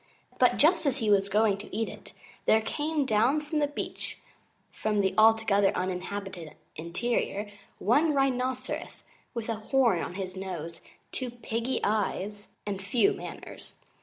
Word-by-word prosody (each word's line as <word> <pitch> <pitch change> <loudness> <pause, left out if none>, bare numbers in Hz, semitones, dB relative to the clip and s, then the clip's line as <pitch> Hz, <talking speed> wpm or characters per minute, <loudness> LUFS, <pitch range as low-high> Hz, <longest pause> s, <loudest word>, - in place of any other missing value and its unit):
But - - +5
just 325 0 +4
as 275 -1 +1
he 220 -5 +1
was 200 0 +3
going 205 0 +3
to 205 - -8
eat 225 - 0
it - - -10 0.4
there 220 - +6
came 295 +5 -1
down 255 +7 +2
to 300 +1 -1
the 290 - +2
beach 290 - -5 0.5
from 215 -1 -1
the 190 - +1
Altogether 220 -3 +5
Uninhabited 185 -3 -4 0.2
Interior 205 +4 -1 0.3
one 290 +9 +3
Rhinoceros 260 -1 -1 0.3
with 230 -2 -3
a 230 - 0
horn 230 -3 +2
on 180 - -5
his 185 -1 -4
nose, 170 -4 -6 0.3
two 255 -2 -3
piggy 235 +1 -2
eyes, 205 -1 -1
and 200 -2 -3
few 245 - +3
manners. - - -9
220 Hz, 145 wpm, -28 LUFS, 195-255 Hz, 0.5 s, there